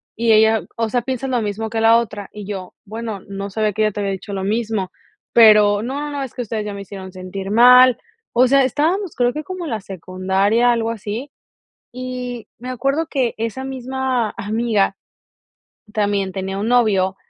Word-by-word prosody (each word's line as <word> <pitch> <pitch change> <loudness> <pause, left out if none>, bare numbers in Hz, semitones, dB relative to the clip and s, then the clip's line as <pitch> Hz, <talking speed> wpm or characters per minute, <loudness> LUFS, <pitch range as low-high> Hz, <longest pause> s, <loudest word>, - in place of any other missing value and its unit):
Y 230 0 +2
ella: 220 0 +5
"O 225 -1 0
sea, 245 +2 +1
¿piensas 260 0 -3
lo 245 -3 +1
mismo 215 +1 -3
que 225 0 -2
la 225 +1 +6
otra?". 210 -4 -4
Y 210 -2 -8
yo: 190 -3 -6
"Bueno, 220 -1 -5
no 200 0 -5
sabía 215 -1 0
que 215 - 0
ella 215 - +2
te 205 - -6
había 200 -1 -1
dicho 200 +2 -7
lo 190 -1 -3
mismo, 215 -2 -1 0.4
pero 210 -2 +6
'No, 270 +4 -3
no, 295 0 -4
no, 280 -1 -3
es 260 - -7
que 245 - -4
ustedes 215 -1 -4
ya 205 - -4
me 200 - -7
hicieron 190 -1 -9
sentir 190 +1 -6
mal'". 250 +2 +7 0.4
O 255 - +7
sea, 275 +1 +5
estábamos 325 - 0
creo 245 0 +2
que 305 +1 -4
como 370 +1 -6
la 225 -8 -3
secundaria, 190 +5 +1
algo 230 -1 0
así. 225 +5 -5 0.6
Y 250 -1 -5
me 250 +2 -8
acuerdo 275 +6 -1
que 260 -6 -1
esa 230 +4 -3
misma 260 -3 -2
amiga 215 -2 0 1.0
también 200 -2 0
tenía 195 0 -4
un 210 +3 -2
novio 200 -6 +3
225 Hz, 190 wpm, -20 LUFS, 200-250 Hz, 1.0 s, mal